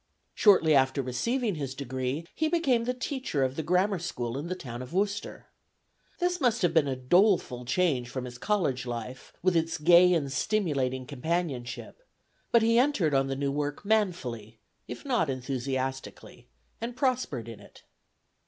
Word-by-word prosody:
Shortly 185 -7 +5
after 135 0 +3
receiving 230 - -1
his 140 -5 -5
degree, 130 +3 -3
he 315 - 0
became 275 -8 +1
the 250 - 0
teacher 255 - -2
of 130 0 -1
the 160 - -2
grammar 180 +4 +1
school 125 -8 -4
in 145 +5 -4
the 185 - -3
town 125 -8 -7
of 130 +3 -9
Worcester. 200 +2 -2 0.7
This 355 -1 -1
must 240 -4 +2
have 170 -2 +3
been 160 -4 +4
a 135 - -1
doleful 130 - +2
change 130 -4 +1
from 130 0 -4
his 120 -1 -9
college 140 -10 0
life, 120 +2 -6
with 185 -1 +3
its 165 0 +1
gay 175 +3 +6
and 140 -4 -1
stimulating 135 -8 0
companionship, 145 - -4 0.5
but 235 -1 +5
he 230 +1 +4
entered 245 - +2
on 135 0 +2
the 135 - -2
new 140 0 -1
work 145 +5 -3
manfully, 145 - -1 0.3
if - - -8
not 245 - +1
enthusiastically, 130 0 -4 0.3
and 235 +1 -4
prospered 250 - -1
in 115 -3 -9
it. 100 - -17
150 Hz, 160 wpm, -28 LUFS, 130-205 Hz, 0.7 s, gay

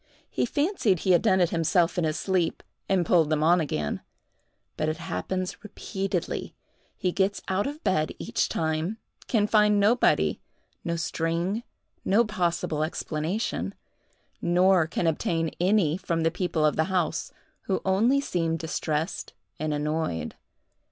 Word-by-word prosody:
He - - 0
fancied 285 - +1
he 190 - +2
had 175 - +5
done 190 -4 +3
it 175 - +2
himself 170 +1 +2
in 175 - +1
his 155 -1 -1
sleep, 185 -4 0 0.3
and 190 -3 +2
pulled 160 -2 +4
them 155 -1 +1
on 175 +2 +5
again;—but 145 - -5
it 155 - -2
happens 185 - -4
repeatedly: 195 -3 -3 0.4
he 185 -3 0
gets 195 +2 0
out 190 +4 0
of 295 +2 -7
bed 155 -4 +1
each - - -1
time—can 175 +7 -1
find 210 -1 +4
nobody, 220 +5 +3 0.4
no 170 -1 -1
string, 170 +5 -1 0.4
no 220 +5 +3
possible 175 -6 -1
explanation—nor 175 +1 -1
can 175 - -2
obtain 165 0 0
any 180 -3 +3
from 170 -3 -1
the 165 - +2
people 175 -3 0
of 150 - +2
the 160 - +3
house, 180 -4 -1 0.3
who 190 - 0
only 220 +9 +3
seem 165 -11 -1
distressed 160 0 -3 0.3
and 155 0 -1
annoyed. 150 - -2
175 Hz, 135 wpm, -26 LUFS, 160-195 Hz, 0.4 s, had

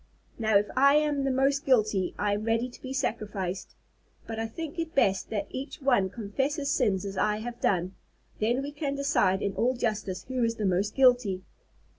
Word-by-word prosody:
"Now, 220 -2 +4
if 205 - +2
I 280 +2 +6
am 295 -2 +2
the - - +1
most 275 +2 +2
guilty, 215 -7 +2
I 205 0 +1
am 205 +1 -2
ready 230 +2 +1
to 245 - -15
be 260 - -6
sacrificed. 205 -8 -3 0.5
But 225 -1 -5
I 225 - -1
think 320 +7 -6
it 330 -1 -4
best 195 -7 +2
that 205 -2 -2
each 265 +3 -6
one 245 -9 +2
confess 240 +8 -2
his 285 -2 -2
sins 205 -9 +1
as 195 -1 -5
I 210 0 +2
have 240 +2 -7
done. 185 -1 +1 0.5
Then 240 +5 +1
we 285 - -5
can 290 -1 -3
decide 245 -9 +2
in 200 - -1
all 250 +5 +1
justice 215 -6 -2
who 255 -1 -2
is 230 0 +1
the 215 - -2
most 190 +2 0
guilty." 245 -8 +3
230 Hz, 200 wpm, -28 LUFS, 205-270 Hz, 0.5 s, I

